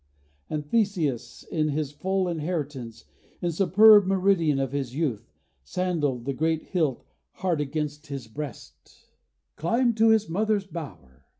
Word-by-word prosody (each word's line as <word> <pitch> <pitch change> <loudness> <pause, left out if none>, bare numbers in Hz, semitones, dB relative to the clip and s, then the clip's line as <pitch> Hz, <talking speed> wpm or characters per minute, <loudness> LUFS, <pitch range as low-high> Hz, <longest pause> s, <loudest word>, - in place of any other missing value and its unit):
And 150 -1 -3
Theseus, 170 - -1
in 155 -2 +1
his 145 -1 -2
full 190 +5 -1
inheritance, 150 -8 -4 0.3
In 175 - -1
the - - -3
superb 205 +3 +7
meridian 185 -6 +2
of 135 -1 -1
his 135 -3 -3
youth, 140 -9 -2 0.3
Sandalled, 150 - -1
the 140 - -1
great 160 +2 0
hilt 155 -9 -1 0.3
hard 180 -5 -1
against 150 +1 -4
his 135 -5 -6
breast, 140 +1 -9 0.5
Climbed 235 +7 +1
to 225 +1 +5
his 220 -1 +3
mother's 205 +3 0
bower. 70 - -9
160 Hz, 135 wpm, -26 LUFS, 140-190 Hz, 0.5 s, superb